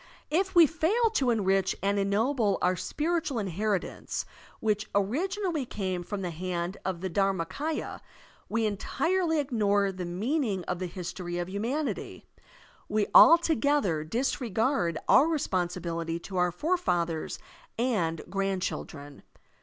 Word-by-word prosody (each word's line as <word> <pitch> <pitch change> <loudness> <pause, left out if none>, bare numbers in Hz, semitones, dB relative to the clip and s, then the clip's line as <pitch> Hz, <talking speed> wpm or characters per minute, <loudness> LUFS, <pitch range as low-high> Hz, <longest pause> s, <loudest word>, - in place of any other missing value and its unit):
If 380 +4 +1
we 340 -1 +9
fail 370 - +1
to 270 - +1
enrich 195 -4 +2
and 200 +1 +2
ennoble 210 +1 +1
our 180 +1 +2
spiritual 310 - -1
inheritance 200 -1 -2 0.3
which 215 -1 0
originally 330 - 0
came 190 -6 -3
from 195 +3 -5
the 175 - -2
hand 175 +2 -3
of 185 -3 -3
the 190 - -2
DharmakS, 195 - 0
ya, - - -6 0.5
we 225 0 +1
entirely 325 - 0
ignore 205 -8 +1
the 185 -1 -5
meaning 205 - -1
of 180 0 -3
the 185 - -2
history 175 0 -5
of 175 +1 -3
htmianity, 240 +10 -3 0.7
we 210 -1 +2
altogether 290 - +5
disregard 225 - 0
our 285 - +6
responsibility 175 - -1
to 185 +2 -7
our 180 0 +2
forefathers 175 - -1 0.4
and 205 -10 0
grand 195 -1 -1
children. 145 -2 -6
200 Hz, 125 wpm, -28 LUFS, 180-285 Hz, 0.7 s, we